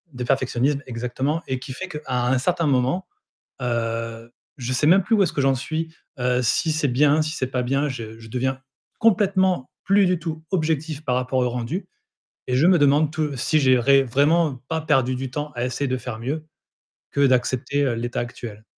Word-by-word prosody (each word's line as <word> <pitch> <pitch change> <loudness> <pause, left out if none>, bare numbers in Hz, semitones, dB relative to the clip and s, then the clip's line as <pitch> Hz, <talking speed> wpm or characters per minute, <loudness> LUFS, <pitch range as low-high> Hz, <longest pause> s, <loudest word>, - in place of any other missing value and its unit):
De 125 0 -5
perfectionnisme, 135 +2 +1
exactement, 130 +6 -2
et 130 - -1
qui 130 +1 -8
fait 190 +8 -6
qu'à 150 -4 -7
un 125 0 +1
certain 170 +5 0
moment, 130 +6 +1 0.6
heu, 115 -1 -3 0.3
je 125 -2 -4
sais 130 +3 +1
même 185 +5 +6
plus 225 +5 +2
où 205 - +4
est-ce 175 - -2
que - - -1
j'en 135 -1 +3
suis. 160 +5 -4 0.3
Heu, 125 0 +1
si 125 +7 +1
c'est 155 -1 +1
bien, 145 +4 +3
si 155 0 -3
c'est 130 -5 -2
pas 130 -1 -1
bien, 135 +4 +1
je 115 -4 -7
je 115 - -12
deviens 130 +3 -2 0.4
complètement 190 - +2 0.2
plus 195 0 +4
du 180 -1 +1
tout 160 -1 -5
objectif 155 -3 -1
par 125 -3 0
rapport 130 +1 0
au 125 -1 +1
rendu 125 - -4 0.6
et 125 - 0
je 135 +6 +4
me 180 -1 +5
demande 145 +1 +4
tou 155 -2 -2
si 155 +5 +2
j'ai 130 -3 +4
ré 135 +3 +5
vraiment 145 +4 +2
pas 160 0 -2
perdu 135 -5 +2
du 130 +1 -4
temps 150 +4 -4
à 120 -1 -3
essayer 130 +3 -2
de 130 0 -1
faire 125 -2 -6
mieux 145 +7 -3 0.7
que 140 - +2
d'accepter, 130 +3 +1
heu, 130 -4 0
l'état 120 +1 -3
actuel. 115 -3 -7
135 Hz, 200 wpm, -23 LUFS, 125-155 Hz, 0.7 s, même